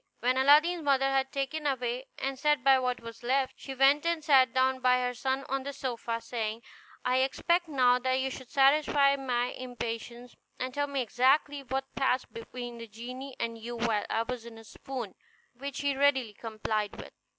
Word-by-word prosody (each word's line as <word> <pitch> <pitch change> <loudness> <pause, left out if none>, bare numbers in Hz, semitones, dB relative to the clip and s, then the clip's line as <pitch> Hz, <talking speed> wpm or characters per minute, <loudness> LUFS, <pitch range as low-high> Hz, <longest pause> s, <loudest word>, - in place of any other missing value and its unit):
When 250 +2 +1
Aladdin's 300 +6 +5
mother 270 -2 +2
had 270 0 +1
taken 280 +2 -2
away 255 -1 -2
and 270 -1 -3
set 295 -3 +2
by 270 -1 +6
what 250 -1 -1
was 230 0 -10
left, 260 +2 +1
she 270 - -8
went 275 +3 +4
and 335 -2 0
sat 265 -5 +5
down 260 +1 +2
by 250 0 +4
her 250 0 -1
son 265 +2 -2
on 270 +1 -1
the 280 +2 -5
sofa, 235 -3 -3
saying, 225 -1 -4 0.4
"I 250 0 +2
expect 340 +6 +1
now 250 -4 +3
that 260 +1 0
you 265 0 -1
should 255 -1 -9
satisfy 280 0 +4
my 250 -3 -1
impatience, 240 -1 -6 0.2
and 255 0 -3
tell 285 +1 0
me 280 -2 -1
exactly 270 +5 +2
what 270 +1 -4
passed 265 -1 0
between 240 +1 -7
the 230 - -8
genie 250 +5 -8
and 230 -1 -3
you 240 +2 -6
while 230 -3 0
I 225 - +1
was 250 -1 -5
in 230 -1 -11
a 225 - -12
swoon"; 240 -1 -7 0.4
which 275 +3 -6
he 285 -1 0
readily 265 -5 +2
complied 215 -1 -3
with. - - -10
260 Hz, 190 wpm, -29 LUFS, 240-275 Hz, 0.4 s, by